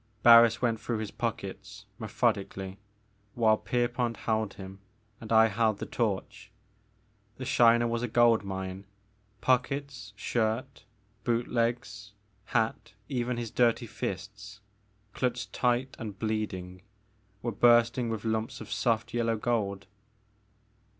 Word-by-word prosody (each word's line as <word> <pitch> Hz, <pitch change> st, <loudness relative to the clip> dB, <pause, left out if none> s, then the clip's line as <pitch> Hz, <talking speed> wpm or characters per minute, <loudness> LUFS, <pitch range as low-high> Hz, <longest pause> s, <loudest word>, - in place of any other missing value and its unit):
Harris 115 Hz, 0 st, +8 dB
went 115 Hz, -2 st, +1 dB
through 115 Hz, 0 st, -2 dB
his 110 Hz, -1 st, -4 dB
pockets 105 Hz, -2 st, -5 dB
methodically 100 Hz, -3 st, -2 dB, 0.6 s
while 110 Hz, -2 st, +4 dB
Pierpont 120 Hz, 0 st, -1 dB
held 110 Hz, -3 st, -1 dB
him 95 Hz, 0 st, -10 dB, 0.4 s
and 110 Hz, -, -9 dB
I 110 Hz, 0 st, +7 dB
held 110 Hz, 0 st, +1 dB
the -, -, -5 dB
torch. 105 Hz, -2 st, -3 dB, 0.9 s
The 130 Hz, -, -6 dB
Shiner 120 Hz, -1 st, +5 dB
was 115 Hz, 0 st, -1 dB
a 125 Hz, -, -1 dB
gold 115 Hz, -1 st, +4 dB
mine; 95 Hz, 0 st, -5 dB, 0.6 s
pockets, 130 Hz, -2 st, 0 dB
shirt, 115 Hz, +4 st, -2 dB, 0.4 s
boot 120 Hz, 0 st, 0 dB
legs, 115 Hz, -3 st, -2 dB, 0.3 s
hat, 110 Hz, -2 st, -1 dB, 0.2 s
even 125 Hz, -2 st, -1 dB
his 120 Hz, -2 st, -4 dB
dirty 120 Hz, 0 st, +2 dB
fists, 105 Hz, +1 st, -6 dB, 0.5 s
clutched 125 Hz, -1 st, -2 dB
tight 125 Hz, +1 st, 0 dB
and 105 Hz, -3 st, -6 dB
bleeding, 95 Hz, -5 st, -3 dB, 0.6 s
were 120 Hz, -, -1 dB
bursting 120 Hz, +2 st, +4 dB
with 110 Hz, -1 st, -4 dB
lumps 110 Hz, 0 st, -2 dB
of 110 Hz, -, -9 dB
soft 115 Hz, -2 st, 0 dB
yellow 115 Hz, -1 st, 0 dB
gold. 100 Hz, -5 st, -1 dB
115 Hz, 120 wpm, -29 LUFS, 105-120 Hz, 0.9 s, Harris